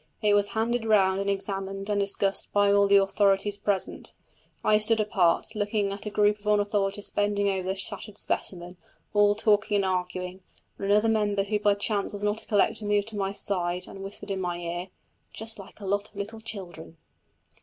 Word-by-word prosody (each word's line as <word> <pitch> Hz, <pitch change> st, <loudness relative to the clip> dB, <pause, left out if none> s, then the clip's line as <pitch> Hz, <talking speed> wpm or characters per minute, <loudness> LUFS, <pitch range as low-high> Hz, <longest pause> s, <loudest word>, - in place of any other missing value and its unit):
It 210 Hz, -1 st, +4 dB
was 205 Hz, 0 st, +3 dB
handed 230 Hz, +2 st, -1 dB
round 195 Hz, -3 st, +3 dB
and 200 Hz, -, -1 dB
examined 195 Hz, 0 st, -3 dB
and 205 Hz, -1 st, 0 dB
discussed 200 Hz, 0 st, 0 dB
by 205 Hz, 0 st, +3 dB
all 200 Hz, 0 st, +4 dB
the 200 Hz, -, +5 dB
authorities 200 Hz, 0 st, +3 dB
present. 200 Hz, -1 st, +1 dB, 0.5 s
I 210 Hz, 0 st, +4 dB
stood 220 Hz, +1 st, +3 dB
apart, 190 Hz, -5 st, +1 dB
looking 205 Hz, -1 st, -1 dB
at 200 Hz, +1 st, -7 dB
a -, -, -1 dB
group 210 Hz, 0 st, +2 dB
of 210 Hz, -, -12 dB
ornithologists 205 Hz, -1 st, 0 dB
bending 205 Hz, -1 st, +1 dB
over 190 Hz, -1 st, -3 dB
the 190 Hz, -, 0 dB
shattered 195 Hz, +1 st, -4 dB
specimen, 180 Hz, -1 st, -3 dB, 0.4 s
all 205 Hz, 0 st, +4 dB
talking 210 Hz, -1 st, +2 dB
and 200 Hz, -1 st, +2 dB
arguing, 180 Hz, 0 st, -3 dB, 0.4 s
when 195 Hz, -, -3 dB
another 210 Hz, +2 st, +4 dB
member 210 Hz, -3 st, +1 dB
who 210 Hz, +1 st, -1 dB
by 205 Hz, -1 st, +3 dB
chance 205 Hz, 0 st, -1 dB
was 205 Hz, 0 st, -6 dB
not 210 Hz, +1 st, 0 dB
a -, -, -21 dB
collector 210 Hz, 0 st, +2 dB
moved 205 Hz, 0 st, +1 dB
to 220 Hz, -, -8 dB
my 195 Hz, -1 st, -1 dB
side 180 Hz, -3 st, -2 dB
and 195 Hz, -, -10 dB
whispered 200 Hz, +1 st, -7 dB
in 190 Hz, -1 st, -2 dB
my 175 Hz, -1 st, -2 dB
ear: 175 Hz, +1 st, -4 dB, 0.5 s
"Just 220 Hz, 0 st, -4 dB
like 195 Hz, -, -12 dB
a 205 Hz, -, -8 dB
lot 205 Hz, +2 st, -1 dB
of 215 Hz, -, -28 dB
little 205 Hz, +3 st, -6 dB
children!" 175 Hz, -7 st, -8 dB
200 Hz, 195 wpm, -27 LUFS, 195-210 Hz, 0.5 s, the